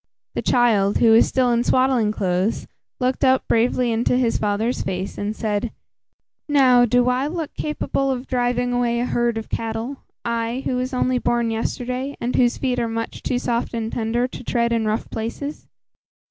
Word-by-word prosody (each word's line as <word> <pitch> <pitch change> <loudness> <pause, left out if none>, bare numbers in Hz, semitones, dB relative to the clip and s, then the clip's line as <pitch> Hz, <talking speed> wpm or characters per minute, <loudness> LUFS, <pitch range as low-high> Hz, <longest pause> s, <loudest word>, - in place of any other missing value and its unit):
The - - -2
child, 215 -5 +3
who 230 - +5
was 225 - +6
still 255 -2 +2
in 235 0 +2
swaddling 255 -4 +2
clothes, 190 0 -1 0.3
looked 255 0 0
up 260 -1 +3
bravely 240 +1 +2
into 235 +2 +1
his 240 -3 +1
father's 215 +4 0
face 190 0 -3
and 210 +1 -3
said, 215 0 -2 0.8
"Now, 255 -4 +5
do 245 +1 +2
I 250 +2 +1
look 320 -1 -4
capable 275 -2 -2
of 260 -1 -2
driving 245 -1 0
away 240 -1 +1
a 245 - 0
herd 240 -2 0
of 220 - -5
cattle; 225 +4 -3 0.3
I, 235 +2 -2
who 255 - 0
was 255 +1 -2
only 255 -1 +1
born 235 -1 0
yesterday, 250 +4 -3
and 240 +1 -2
whose 245 -1 +3
feet 250 -2 -1
are 230 -1 -1
much 230 0 -4
too 250 - -1
soft 235 -1 -2
and 225 -1 -3
tender 235 +2 0
to 250 - -9
tread 235 0 0
in 225 -2 0
rough 215 +1 -1
places? 260 +7 -5
240 Hz, 180 wpm, -22 LUFS, 225-255 Hz, 0.8 s, was